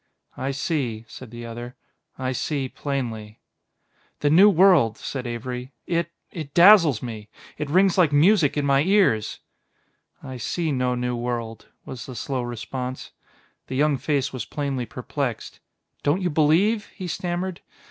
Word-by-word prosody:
"I 130 - -3
see," 130 -5 -2
said 130 +2 -11
the 120 +1 -8
other; 120 +2 -7 0.4
"I 130 0 -2
see 135 +1 -2
plainly." 115 -7 -5 0.8
"The 145 - +2
new 190 +6 +8
world," 170 - +5
said 130 -3 -5
Avery. 125 +2 -5
"It 170 -1 -1 0.2
it 155 -4 -7
dazzles 170 - +7
me; 110 -3 -7 0.3
it 150 - -3
rings 185 +3 +3
like 165 -5 +5
music 155 0 +4
in 145 - 0
my 140 0 +4
ears." 185 - +2 0.8
"I 130 -1 -7
see 160 +7 -2
no 125 -2 0
new 125 0 -2
world," 120 -2 -4 0.2
was 120 -3 -8
the 130 - -8
slow 130 +1 -3
response. 125 +2 -5 0.6
The 130 - -5
young 145 +1 +3
face 140 0 -1
was 130 -4 -4
plainly 135 -2 -3
perplexed. 125 -1 -4 0.4
"Don't 160 +7 +1
you 175 - 0
believe?" 175 +9 +3
he 185 - -6
stammered. 175 +1 -3
135 Hz, 145 wpm, -24 LUFS, 120-165 Hz, 0.8 s, new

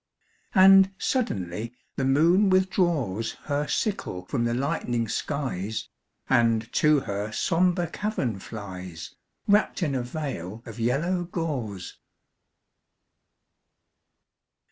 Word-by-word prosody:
And 195 0 +8
suddenly 115 - -2 0.2
the 135 - -1
moon 170 +9 +4
withdraws 175 - +1
Her 145 0 -1
sickle 140 - -2
from 120 +3 -1
the 120 - 0
lightening 125 -4 -1
skies, 110 -6 -3 0.4
And 115 -2 +2
to 150 -2 +4
her 100 0 -4
sombre 175 - +1
cavern 160 - -2
flies, 95 -6 -8 0.3
Wrapped 205 -2 +3
in 150 -4 0
a 130 - 0
veil 120 - -5
of 115 -1 -9
yellow 165 +10 0
gauze. 130 - -4
135 Hz, 100 wpm, -26 LUFS, 110-175 Hz, 0.4 s, And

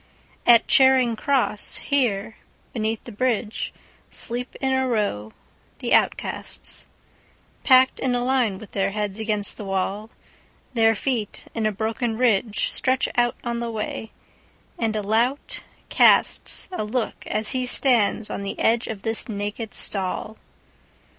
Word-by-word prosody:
At 235 -1 +7
Charing 260 -3 +5
Cross, 250 -4 0
here, 230 -6 0 0.4
beneath 220 -1 -2
the 240 - -9
bridgeSleep 240 +1 -3
in 265 -1 0
a 260 0 +1
row 200 - -1 0.5
the - - -1
outcasts, - - 0 0.8
Packed 260 0 +5
in 255 -2 0
a 245 - 0
line 250 -7 +1
with 205 +1 -12
their 195 0 0
heads 210 -1 -3
against 210 -2 -1
the - - -7
wall. 195 +2 -2 0.6
Their 225 -2 +4
feet, 230 -3 -3
in 225 -2 0
a - - 0
broken 225 +2 -2
ridgeStretch 240 +2 +1
out 240 0 +2
on 235 -1 -2
the 235 0 -3
way, 220 0 -5 0.7
and 225 -2 0
a 210 - -1
lout 235 +7 0 0.3
castsA 370 - +3
look 225 +2 -3
as 215 0 +1
he 255 -1 -1
stands 230 -5 +2
on - - -4
the 200 - -5
edge 230 +1 +2
of 215 -3 -6
this 225 +1 -1
naked 210 +1 -4
stall. 195 +2 -2
225 Hz, 135 wpm, -23 LUFS, 210-250 Hz, 0.8 s, At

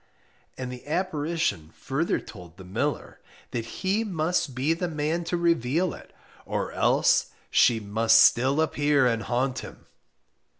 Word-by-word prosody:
And 125 -1 -5
the 125 +2 -10
apparition 160 - -1
further 145 +5 -1
told 90 -5 -13
the 95 - -11
miller 90 +1 -3 0.3
that 115 -2 -3
he 195 - -1
must 170 - -1
be 140 +5 +1
the 175 +2 -3
man 160 +1 -2
to 175 +1 -1
reveal 170 0 +1
it, - - -13 0.3
or - - -3
else - - +2 0.2
she 120 -2 +4
must 110 +2 +3
still 130 +7 +4
appear 145 -3 +2
and 115 -2 +1
haunt 125 +4 -1
him. - - -11
145 Hz, 140 wpm, -26 LUFS, 120-165 Hz, 0.3 s, she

